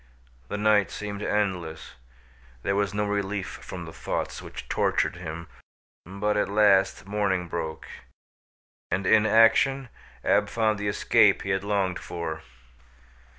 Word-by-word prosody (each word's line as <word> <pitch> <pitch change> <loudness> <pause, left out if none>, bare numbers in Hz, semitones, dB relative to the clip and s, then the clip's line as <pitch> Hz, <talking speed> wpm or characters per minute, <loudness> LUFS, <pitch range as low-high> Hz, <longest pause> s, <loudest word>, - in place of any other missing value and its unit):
The 105 - -4
night 105 -3 +3
seemed 105 -1 -6
endless. 90 -7 -2 0.7
There 100 - 0
was 100 -1 +1
no 105 0 -1
relief 100 -1 -2
from - - -8
the - - -10
thoughts - - -4
which - - -9
tortured - - 0
him, 80 +1 -7 0.6
but, 100 +3 -1
at 105 - +1
last, 100 -2 +3
morning 100 -3 -1
broke, 80 -2 -5 1.0
and 95 +2 -1
in 110 +2 +5
action 125 +4 +4 0.3
Ab 105 0 +2
found 110 -2 +1
the 105 - -2
escape 100 - +3
he 95 - -2
had 95 0 0
longed 100 -3 0
for. 80 -2 -5
100 Hz, 135 wpm, -26 LUFS, 95-105 Hz, 1.0 s, in